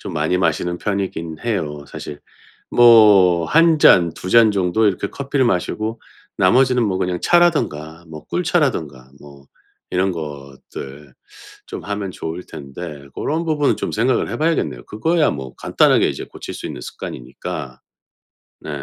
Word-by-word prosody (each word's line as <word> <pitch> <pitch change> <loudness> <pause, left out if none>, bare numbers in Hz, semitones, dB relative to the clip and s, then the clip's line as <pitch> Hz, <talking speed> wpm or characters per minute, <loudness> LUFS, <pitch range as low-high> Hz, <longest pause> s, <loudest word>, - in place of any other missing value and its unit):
좀 95 - -7
많이 80 +3 0
마시는 90 -1 -1
편이기는 95 -6 -3
해요, 80 -11 -3
사실. 75 - -8 0.5
뭐 105 -8 +6
1 165 - +4
잔 85 - +5
2 90 - -7
잔 115 -2 +6
정도 100 +2 +1
이렇게 100 0 0
커피를 140 +1 -1
마시고 110 +3 -2 0.4
나머지는 125 +6 +3
뭐 95 -3 -1
그냥 90 -1 -1
차라든가 105 - +1
뭐 80 -1 -10
꿀차라든가 85 - -1
뭐 70 -1 -15 0.4
이런 95 +1 +1
것들 70 -2 -9 0.5
좀 - - -8
하면 100 -1 -4
좋을 85 0 -6
텐데 70 0 -9
고런 160 +3 -2
부분은 150 -3 +1
좀 - - -4
생각을 120 +3 +1
해봐야겠네요. 120 - -1
그거야 160 +9 +1
뭐 65 -3 -7
간단하게 - - +2
이제 - - -5
고칠 - - -9
수 - - -7
있는 - - -7
습관이니까. - - -7 0.8
네. - - -9
95 Hz, 295 characters per minute, -19 LUFS, 75-120 Hz, 0.8 s, 뭐